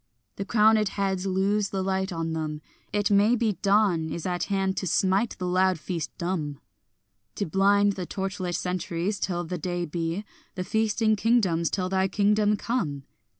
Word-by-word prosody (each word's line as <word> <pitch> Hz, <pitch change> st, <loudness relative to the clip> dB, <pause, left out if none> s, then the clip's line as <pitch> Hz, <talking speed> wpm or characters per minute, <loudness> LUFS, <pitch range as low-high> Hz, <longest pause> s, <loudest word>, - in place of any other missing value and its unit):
The 200 Hz, -, -3 dB
crowned 215 Hz, -1 st, +4 dB
heads 195 Hz, -1 st, -1 dB
lose 195 Hz, +2 st, +1 dB
the 190 Hz, -1 st, -2 dB
light 190 Hz, 0 st, -1 dB
on 165 Hz, -1 st, -3 dB
them; 155 Hz, -1 st, -4 dB, 0.3 s
it 205 Hz, 0 st, 0 dB
may 205 Hz, +4 st, +5 dB
be 220 Hz, -4 st, 0 dB
Dawn 200 Hz, -6 st, +3 dB
is 160 Hz, +1 st, -5 dB
at 180 Hz, -1 st, -1 dB
hand 195 Hz, -1 st, 0 dB
to 190 Hz, -, -2 dB
smite 195 Hz, +6 st, +1 dB
the 180 Hz, -, -4 dB
loud 185 Hz, 0 st, +2 dB
feast 165 Hz, -1 st, -4 dB
dumb; 165 Hz, -6 st, -3 dB, 0.8 s
To 200 Hz, -, -1 dB
blind 200 Hz, +4 st, +3 dB
the 185 Hz, -3 st, -5 dB
torch 195 Hz, 0 st, -4 dB
lit 180 Hz, -2 st, -2 dB
centuries 180 Hz, +2 st, -2 dB
till 175 Hz, -2 st, -1 dB
the 175 Hz, +1 st, -5 dB
day 175 Hz, -1 st, -2 dB
be, 170 Hz, +5 st, -3 dB, 0.3 s
The 185 Hz, -, -2 dB
feasting 220 Hz, +2 st, +1 dB
kingdoms 195 Hz, -7 st, +2 dB
till 185 Hz, -2 st, -1 dB
thy 190 Hz, 0 st, +1 dB
kingdom 210 Hz, +1 st, +2 dB
come. 190 Hz, -, -2 dB
190 Hz, 170 wpm, -26 LUFS, 175-205 Hz, 0.8 s, may